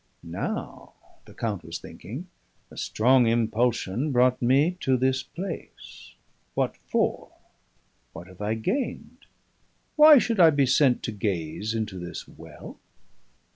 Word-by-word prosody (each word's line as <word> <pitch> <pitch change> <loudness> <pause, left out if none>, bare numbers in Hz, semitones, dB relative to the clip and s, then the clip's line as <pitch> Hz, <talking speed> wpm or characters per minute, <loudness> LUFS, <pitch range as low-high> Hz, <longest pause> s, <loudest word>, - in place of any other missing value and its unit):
'Now,' - - -6 0.3
the - - -15
count 105 -5 -3
was 80 +1 -6
thinking, 130 - -9 0.4
'a - - -14
strong 125 +2 +3
impulsion 115 +2 0
brought 125 0 +3
me 140 +9 +2
to 130 -5 +1
this 130 +1 +1
place. 180 +4 -9 0.4
What - - 0
for? - - -2 0.8
what 85 - -10
have 95 +1 -15
I 105 +2 -1
gained? 195 - -4 0.7
why 305 -1 +9
should 230 -3 0
I 165 -2 +8
be 145 -3 +2
sent 130 -1 +3
to - - -3
gaze 100 0 -3
into 105 -4 -3
this 85 -1 -7
well?' - - -12
125 Hz, 130 wpm, -25 LUFS, 105-145 Hz, 0.8 s, why